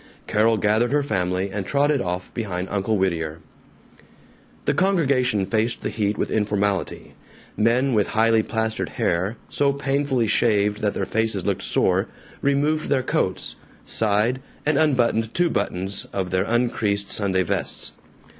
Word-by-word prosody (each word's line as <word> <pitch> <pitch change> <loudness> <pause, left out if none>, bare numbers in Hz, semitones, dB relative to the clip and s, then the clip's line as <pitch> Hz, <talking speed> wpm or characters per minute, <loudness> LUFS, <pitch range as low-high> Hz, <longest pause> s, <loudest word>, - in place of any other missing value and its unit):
Carol 110 +1 +2
gathered 110 +4 +2
her 145 0 +2
family 95 -5 -1
and 100 0 -3
trotted 140 +5 +1
off 90 0 -4
behind 95 -5 -3
Uncle 105 +2 0
Whittier. 85 -4 -1 1.3
The - - +2
congregation 135 - +2
faced 115 +3 -1
the - - -3
heat 105 -1 -1
with - - -2
informality. 105 -2 -1 0.4
Men 125 +5 +2
with 105 -2 +2
highly 115 0 +3
plastered 110 0 -2
hair, 95 +7 0
so 140 -1 +2
painfully 140 -3 0
shaved 105 -1 +2
that 105 -1 0
their - - -1
faces 110 -4 0
looked - - 0
sore, - - +1 0.3
removed 145 +3 +1
their 135 -3 +2
coats, - - -1 0.3
sighed, 110 +4 +1 0.2
and 150 0 +2
unbuttoned 120 -7 +2
two 175 -1 +2
buttons 95 +2 -2
of 95 -2 -3
their 95 +1 +1
uncreased 110 -4 0
Sunday 95 -3 +1
vests. 85 - -3
110 Hz, 140 wpm, -23 LUFS, 100-130 Hz, 1.3 s, highly